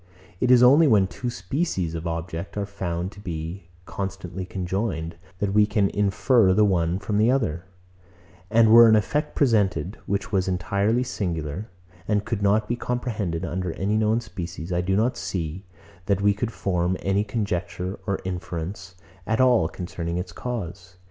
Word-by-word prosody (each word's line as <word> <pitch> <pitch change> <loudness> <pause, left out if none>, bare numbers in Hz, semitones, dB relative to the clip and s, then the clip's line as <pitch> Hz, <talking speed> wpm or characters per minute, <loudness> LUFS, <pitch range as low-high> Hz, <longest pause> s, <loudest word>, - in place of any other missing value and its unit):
It 125 - +1
is 125 -1 +7
only 145 +6 +7
when 105 -7 +5
two 120 +6 -5
species 95 - -2
of 85 +1 -4
objects 85 +3 -5
are 100 - -1
found 95 -2 -4
to 100 - -14
be 85 -1 -6 0.2
constantly 95 -1 -5
conjoined, 95 -3 -3 0.2
that 100 +1 -1
we 105 0 +5
can 100 -2 +1
infer 100 0 +3
the 105 +1 +5
one 85 -3 +1
from 100 +2 -1
the 110 +2 +4
other; 95 - 0 0.8
and 110 0 +5
were 115 0 +9
an 110 - +6
effect 150 +8 0
presented, 100 - +1
which 100 +1 -2
was 95 -3 +1
entirely 100 +6 +1
singular, 90 - -4 0.4
and 105 -1 +1
could 115 -2 -2
not 105 +2 +2
be 120 - 0
comprehended 110 -9 -2
under 90 0 -3
any 100 +2 -1
known 110 +2 +2
species, 90 -4 -6
I 90 - +1
do 95 +2 0
not 115 +5 +1
see, 90 +1 -4 0.4
that 100 -2 +2
we 100 0 +3
could 115 +3 -3
form 90 -3 -1
any 100 +1 +1
conjecture 95 -3 -3
or 100 -2 0
inference 90 +1 -5 0.3
at 110 0 0
all 125 -10 +4
concerning 85 -2 -4
its 90 0 -4
cause. 95 -5 -6
100 Hz, 165 wpm, -24 LUFS, 90-110 Hz, 0.8 s, were